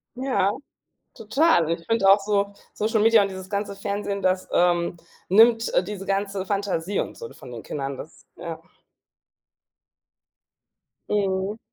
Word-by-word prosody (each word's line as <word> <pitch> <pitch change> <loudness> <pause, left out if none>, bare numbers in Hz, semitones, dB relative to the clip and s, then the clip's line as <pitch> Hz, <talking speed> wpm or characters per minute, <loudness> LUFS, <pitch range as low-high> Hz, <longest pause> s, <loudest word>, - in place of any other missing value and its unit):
Ja, 250 -6 +1 0.6
total. 225 - +2
Ich 165 0 -3
finde 225 -4 +2
auch 200 - +7
so, 200 0 0 0.2
Social 220 +1 0
Media 225 0 +6
und 200 - 0
dieses 190 -1 -8
ganze 200 -1 -3
Fernsehen, 200 0 -3
das, 185 0 0
ähm, 175 0 +2 0.3
nimmt, 225 +4 +5
äh, - - +3
diese 195 0 -7
ganze 195 0 -2
Fantasie 200 -2 -1
und - - -4
so 470 -1 -8
von 130 - -12
den 115 -2 -8
Kindern, 135 -2 -4
das 155 - -11
ja. 165 -2 -7 2.5
Mhm. 195 0 0
200 Hz, 140 wpm, -24 LUFS, 185-210 Hz, 2.5 s, auch